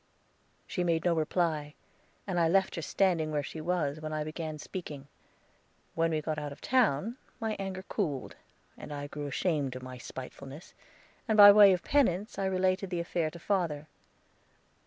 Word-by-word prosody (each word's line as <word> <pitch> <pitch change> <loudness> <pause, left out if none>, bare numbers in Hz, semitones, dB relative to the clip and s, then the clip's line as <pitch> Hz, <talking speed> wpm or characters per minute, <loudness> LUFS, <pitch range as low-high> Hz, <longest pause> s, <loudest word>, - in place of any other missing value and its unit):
She 180 - -2
made 165 -1 0
no 175 - +4
reply, 155 -2 -1 0.5
and 180 -3 -1
I 165 - +4
left 190 +3 +2
her 170 - -4
standing 170 -2 +1
where 150 -1 -1
she 155 +3 -7
was 155 -3 -1
when 155 0 -5
I 155 0 -1
began 155 0 -5
speaking. 150 -4 -7 0.9
When 165 0 +1
we 155 -2 -1
got 155 0 -2
out 145 -1 -5
of 140 - -10
town, 230 - +1 0.2
my 220 -2 -2
anger 190 -1 -4
cooled, 155 - -3 0.4
and - - -10
I 145 -1 -4
grew 145 0 -6
ashamed 145 -2 -1
of 130 - -7
my 130 -1 -8
spitefulness, 135 +4 -9 0.5
and 220 -1 +2
by 205 -1 +12
way 205 -1 +8
of 180 -1 0
penance 215 -8 +1
I 195 - 0
related 185 0 +1
the 175 -2 -2
affair 170 -1 -1
to 170 - -11
father. 170 -5 -1
165 Hz, 175 wpm, -30 LUFS, 150-190 Hz, 0.9 s, by